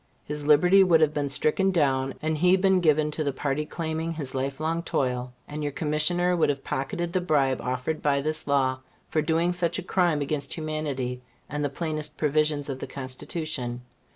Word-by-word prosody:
His 150 0 -5
liberty 180 +6 +6
would 170 -3 +5
have 155 -1 +3
been 145 -2 -1
stricken 155 +7 +2
down, 135 -6 +1
and 155 0 0
he 180 +4 +4
been 190 0 +3
given 155 -3 +3
to 155 - -2
the 140 - 0
party 145 +2 -2
claiming 160 0 -3
his 145 -5 -6
life 135 +1 -2
long 165 +2 -1
toil, 125 -5 -1 0.2
and 150 +1 -5
your 145 -1 -1
Commissioner 165 +5 +1
would 165 - +2
have 140 -1 -2
pocketed 170 +6 -3
the 185 - +1
bribe 140 -6 +1
offered 130 +5 -2
by 140 -1 +2
this 155 +2 -3
law 130 -2 +2 0.3
for 155 - +1
doing 165 +3 +1
such 175 -1 0
a 190 - -4
crime 175 -4 +2
against 145 -1 -2
humanity 145 -6 -3 0.3
and 150 +1 -3
the 145 - 0
plainest 155 0 -4
provisions 150 -1 +1
of 135 -2 -4
the - - -5
Constitution. 130 -2 -4
150 Hz, 190 wpm, -26 LUFS, 140-165 Hz, 0.3 s, liberty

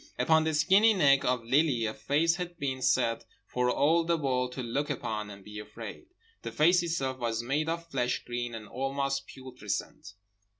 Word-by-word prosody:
Upon 160 0 +3
the 160 -1 0
skinny 195 +8 +5
neck 140 -6 +4
of 125 -2 +1
Lily 130 -1 +2
a 110 - -2
face 165 +7 +1
had 175 -1 -5
been 130 -4 -3
set 125 -3 +1 0.2
for 125 0 0
all 160 +6 +3
the 170 0 +1
world 125 -4 -1
to 130 - -5
look 140 +6 -2
upon 110 -6 -3
and 100 -1 -11
be 105 +1 -9
afraid. 110 - -9 0.3
The - - -5
face 175 +4 +4
itself 135 -6 -2
was 115 -1 -2
made 145 +6 -1
of 170 0 -3
flesh 125 -2 -1
green 120 -1 -4
and 110 -1 -8
almost 135 +1 -2
putrescent. 125 -7 -6
135 Hz, 180 wpm, -29 LUFS, 120-160 Hz, 0.3 s, skinny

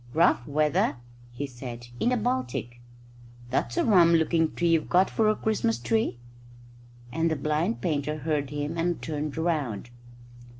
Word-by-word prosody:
"Rough 160 -7 +3
weather," 150 0 +1 0.4
he 125 +4 -4
said, 120 -2 -8
"in 240 - +2
the 250 - +2
Baltic. 210 - -2 0.7
That's 120 -2 -1
a - - +2
rum 175 -6 +6
looking 160 0 +2
tree 175 0 +1
you've 165 -2 +2
got 185 +2 +4
for 220 -1 +2
a 215 - +2
Christmas 220 +1 0
tree," 225 - 0 0.9
and 165 +5 +1
the 160 - 0
blind 155 - -1
painter 150 -3 -1
heard 150 -2 -1
him 150 +3 -3
and 175 +1 0
turned 150 -1 -4
round. 145 - -1
155 Hz, 155 wpm, -27 LUFS, 140-175 Hz, 0.9 s, rum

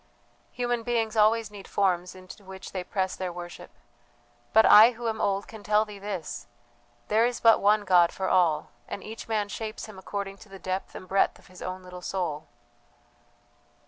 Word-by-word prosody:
Human 245 -1 -1
beings 230 -1 -1
always 220 0 +3
need 200 -2 -10
forms 180 -3 0
into 185 +2 -12
which 190 0 -10
they 185 -2 -4
press 190 0 -2
their 185 -1 -4
worship, 175 0 -9 0.8
but 220 - +6
I, 220 +4 +9
who 235 0 -5
am 220 -1 -2
old, 200 0 0
can 220 -1 -10
tell 210 +1 +2
thee 210 -1 -10
this: 195 -11 -5 0.6
there 220 +2 +3
is 240 0 0
but 225 -1 +5
one 210 +1 +3
God 175 -2 +5
for 190 - -3
all, 170 -5 +2 0.2
and 200 - -6
each 220 +1 -8
man 215 -2 0
shapes 215 +1 -6
Him 215 -3 -11
according 195 0 -5
to 215 - -15
the 195 - -10
depth 185 0 -4
and 185 - -9
breadth 195 +1 +2
of - - -21
his 185 - -13
own 185 0 -5
little 180 0 -10
soul. 170 -5 -3
200 Hz, 185 wpm, -27 LUFS, 185-220 Hz, 0.8 s, I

